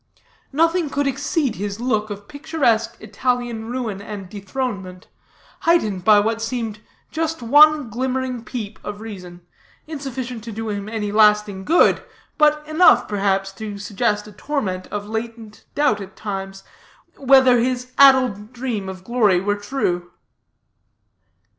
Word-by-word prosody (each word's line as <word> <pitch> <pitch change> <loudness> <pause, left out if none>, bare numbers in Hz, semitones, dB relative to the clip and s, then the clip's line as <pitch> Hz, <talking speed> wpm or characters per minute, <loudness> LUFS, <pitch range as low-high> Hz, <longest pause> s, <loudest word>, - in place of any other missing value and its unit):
Nothing 330 +2 +2
could 285 +1 -1
exceed 275 -1 -1
his 200 +2 -4
look 220 -3 0
of 205 0 -8
picturesque 280 -6 0
Italian 235 +1 -2
ruin 230 -5 -4
and 200 -2 -7
dethronement, 195 -3 -5 0.5
heightened 215 - +1
by 210 +1 +6
what 225 +2 0
seemed 225 -2 -3 0.3
just 320 -3 -2
one 295 +3 +6
glimmering 255 0 -2
peep 220 -3 -6
of 205 0 -6
reason, 180 -5 -10 0.4
insufficient 260 -6 -6
to 230 - -6
do 225 +1 -5
him 205 0 -4
any 215 -2 -3
lasting 210 -2 +3
good, 335 - +4 0.4
but 300 0 +3
enough, 315 +4 +5
perhaps, 195 -1 0
to 205 0 -7
suggest 210 +1 -1
a 210 - -11
torment 205 -6 -3
of 205 0 -5
latent 225 -1 -6
doubts 285 -8 +2
at 195 - -10
times, 195 -2 -6 0.5
whether 260 -2 +5
his 250 +1 -1
addled 255 -6 +5
dream 235 -6 -3
of 185 -1 -9
glory 215 -5 +2
were 205 +3 0
true. 205 -6 -2
225 Hz, 135 wpm, -21 LUFS, 205-260 Hz, 0.5 s, by